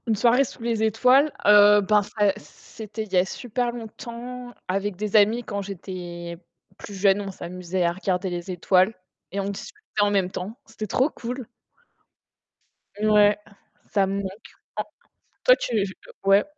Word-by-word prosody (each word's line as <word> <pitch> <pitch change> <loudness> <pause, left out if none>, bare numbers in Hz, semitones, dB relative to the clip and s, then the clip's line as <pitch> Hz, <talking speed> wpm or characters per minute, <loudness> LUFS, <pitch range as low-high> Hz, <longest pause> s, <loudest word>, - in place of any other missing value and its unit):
Une 225 - +2
soirée 240 +5 +4
sous 240 - -9
les 230 -2 0
étoiles, 255 +7 +4
heu, 205 0 +8
ben, 210 +1 +3
ça 205 0 +1
c - - -10
c'était 215 +8 -9
il 205 -3 -13
y - - +4
a 180 - +4
super 240 +4 -2
longtemps, 240 +2 -8 0.2
avec 195 +1 -1
des 210 +2 -3
amis, 215 +3 +5
quand 200 -2 -4
j'étais 175 -3 -7 0.4
plus 205 - -9
jeune. 195 +1 +3
On 200 - -5
s'amusait 180 0 -4
à 170 - +3
regarder 190 +1 -1
les 175 +1 -5
étoiles, 185 +3 +2 0.4
et 200 - -3
on 195 0 -1
discutait 210 - -5
en 205 - +4
même 195 -3 +1
temps. 200 +7 -6
C'était 220 -1 -7
trop 260 +8 +2
cool! 245 +1 -6 1.6
Mouais, 210 -1 +5 0.5
ça 200 -2 +2
me 195 - -2
manque. - - -7 1.2
En - - -67
toi, - - +7
tu 240 - -2
v 205 - +3 0.4
ouais. 195 +1 +5
205 Hz, 165 wpm, -24 LUFS, 190-225 Hz, 1.6 s, heu